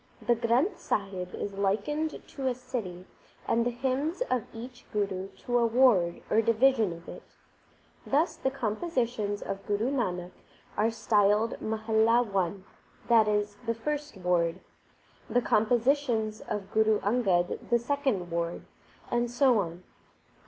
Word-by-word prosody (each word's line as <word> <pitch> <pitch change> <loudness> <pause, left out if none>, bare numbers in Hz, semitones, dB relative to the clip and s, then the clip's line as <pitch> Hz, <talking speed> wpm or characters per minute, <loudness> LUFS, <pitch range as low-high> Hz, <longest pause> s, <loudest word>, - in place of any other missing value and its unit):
The 240 - +4
Granth 245 - +1
Sahib 190 -3 -3
is 200 - -4
likened 225 +11 -1
to 270 -2 -4
a 250 - +1
city 230 -8 -6 0.4
and 235 - +2
the 245 - +1
hymns 265 - -2
of 250 -3 +1
each 245 +2 -9
Guru 195 -2 -1 0.2
to 245 0 +2
a 235 - +3
ward 225 -8 +3
or 220 - +5
division 230 -2 +3
of 170 0 -10
it. - - -8 0.9
Thus 310 +3 +2
the 265 - -1
compositions 235 -4 -2
of 195 0 -5
Guru 215 +5 0
Nanak 180 -9 -2 0.4
are 220 - +2
styled 215 -1 +2
Mahalla 220 +2 +2
one, 195 -2 -2 0.4
that 225 -2 +6
is, 210 -1 0
the 230 - +1
first 295 +1 -4
ward; 180 -1 0 0.7
the 245 - +3
compositions 235 -1 +1
of 205 -2 -4
Guru 220 -1 +3
Angad 195 -5 +1
the 240 - +5
second 235 - -1
ward, 170 0 -2 0.5
and 240 0 +1
so 245 -1 +4
on. 175 -1 -4
225 Hz, 140 wpm, -29 LUFS, 200-250 Hz, 0.9 s, that